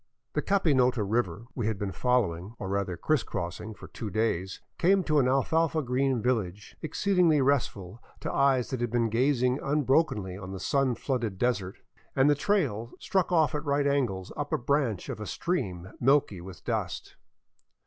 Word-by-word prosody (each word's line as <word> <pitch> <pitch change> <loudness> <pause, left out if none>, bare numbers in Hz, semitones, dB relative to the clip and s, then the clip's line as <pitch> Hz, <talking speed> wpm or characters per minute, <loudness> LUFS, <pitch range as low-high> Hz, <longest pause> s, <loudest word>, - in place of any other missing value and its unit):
The 150 - 0
Capinota 130 - +2
river 105 -2 -1
we 120 -5 -2
had 110 -2 -1
been 100 0 -3
following, 110 -5 0
or 95 - -5
rather 100 -3 -1
criss 155 -4 +1
cross 90 -2 -4
ing, 110 0 -7
for - - -11
two 110 - -6
days 95 -3 -1 0.2
came 190 +2 +4
to 155 -3 +2
an 130 - +3
alfalfa 155 +4 +2
green 130 -1 0
village, 105 -6 -2
exceedingly 175 -1 +2
restful 120 -7 0 0.2
to - - -3
eyes 135 -3 +2
that 130 -2 -2
had 120 - 0
been 115 0 +1
gazing 125 +2 +2
unbrokenly 135 - +1
on 95 -1 -7
the 95 - -6
sun 135 +1 +1
flooded 120 -8 -2
desert, 100 -5 -1 0.4
and 135 +2 +5
the - - +6
trail 145 - 0
struck 190 -2 0
off 160 -3 +3
at 150 0 -2
right 145 -1 +1
angles 120 -10 0
up - - -4
a - - +2
branch 125 -6 0
of - - -5
a 105 - -5
stream 100 - -3
milky 130 -8 +2
with 90 0 -11
dust. - - -3
125 Hz, 175 wpm, -28 LUFS, 100-145 Hz, 0.4 s, the